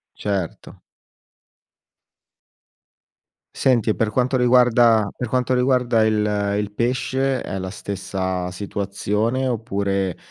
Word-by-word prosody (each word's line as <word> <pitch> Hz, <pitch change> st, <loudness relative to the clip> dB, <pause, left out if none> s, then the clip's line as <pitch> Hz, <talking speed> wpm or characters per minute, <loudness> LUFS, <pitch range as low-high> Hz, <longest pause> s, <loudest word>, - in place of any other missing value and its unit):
Certo. 100 Hz, -5 st, -4 dB, 2.8 s
Senti, 120 Hz, -4 st, +2 dB
e 110 Hz, -, +2 dB
per 110 Hz, -1 st, 0 dB
quanto 130 Hz, +3 st, +1 dB
riguarda 120 Hz, -3 st, +4 dB
per 125 Hz, -, -4 dB
quanto 125 Hz, +2 st, 0 dB
riguarda 125 Hz, -3 st, +2 dB
il 105 Hz, -2 st, 0 dB
il 105 Hz, 0 st, -2 dB
pesce 130 Hz, +3 st, 0 dB
è 95 Hz, -, -5 dB
la 95 Hz, 0 st, -4 dB
stessa 95 Hz, -2 st, -4 dB
situazione 105 Hz, +6 st, -2 dB
oppure, 100 Hz, -6 st, -1 dB
110 Hz, 100 wpm, -21 LUFS, 100-125 Hz, 2.8 s, riguarda